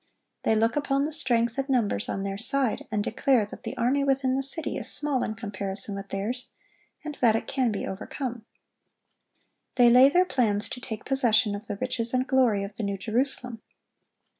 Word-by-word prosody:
They 220 - +2
look 225 +1 +2
upon 280 -1 0
the 310 - -3
strength 240 -5 +2
and 270 +1 -3
numbers 225 - 0
on 195 - -3
their 195 0 -4
side, 260 +1 0
and 210 -1 0
declare 245 -1 +2
that 205 - -11
the - - -6
army 255 +4 +1
within 270 -1 +1
the 270 - 0
city 275 +4 -3
is - - -1
small 290 -4 +1
in 220 - -3
comparison 200 -2 -4
with 195 0 -7
theirs, 220 +6 -3 0.6
and 300 -1 -5
that 230 -3 +5
it 225 - -2
can 260 -4 0
be 200 - -3
overcome. 235 +4 -5 1.3
They 240 -1 +6
lay 255 +3 +8
their 360 +5 +3
plans 225 - 0
to 250 - -6
take 220 -3 -7
possession 235 -5 +2
of 205 +2 -7
the 205 - -4
riches 250 0 0
and 255 0 +1
glory 250 -7 +2
of 200 +1 -8
the 225 - -4
New 200 -1 -2
Jerusalem. 240 +2 -1
235 Hz, 190 wpm, -26 LUFS, 210-265 Hz, 1.3 s, lay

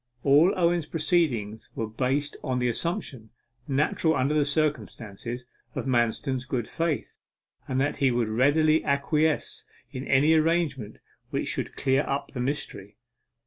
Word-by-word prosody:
All 145 +6 +5
Owen's 170 -2 +2
proceedings 150 - 0
were 115 - -2
based 135 +6 -1
on 130 -1 -1
the 125 0 +1
assumption, 130 - -2 0.4
natural 150 +3 +1
under 135 +3 +1
the 150 -1 +3
circumstances, 125 -6 -2 0.3
of - - -3
Manston's 125 +1 0
good 130 -4 -2
faith, 165 -3 -3 0.5
and 130 - -1
that 145 +2 0
he 135 - +3
would 120 -2 0
readily 145 +7 +3
acquiesce 150 +2 0 0.3
in 130 +1 -6
any 145 +4 +4
arrangement 160 -8 +1 0.3
which - - -2
should - - -3
clear 135 0 +2
up 140 +1 -2
the 125 - -4
mystery. 125 -7 -4
140 Hz, 140 wpm, -26 LUFS, 125-155 Hz, 0.5 s, All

